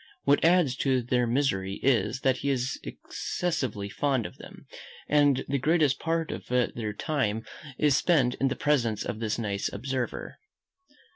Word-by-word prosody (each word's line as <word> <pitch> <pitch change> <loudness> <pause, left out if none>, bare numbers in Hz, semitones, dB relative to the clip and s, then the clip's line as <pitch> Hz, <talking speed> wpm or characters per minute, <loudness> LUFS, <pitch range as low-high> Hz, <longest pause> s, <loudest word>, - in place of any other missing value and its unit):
What 145 +1 +3
adds 165 -6 +4
to 130 -3 +1
their 125 0 +1
misery 100 -7 0
is, 135 0 +2
that 130 -1 +2
he 140 - -2
is 130 -1 -1
excessively 130 - -3
fond 130 +1 0
of - - -8
them, - - -12 0.4
and 145 -3 +3
the 140 0 0
greatest 150 -1 +2
part 165 0 -1
of - - -7
their 120 -3 -1
time 110 -3 -1 0.3
is 145 -3 +3
spent 135 -8 +3
in 135 - +4
the 135 - -1
presence 120 -8 +1
of 110 - -4
this 110 -2 -1
nice 100 -4 -2
observer. 125 +3 -4
130 Hz, 155 wpm, -28 LUFS, 115-145 Hz, 0.4 s, adds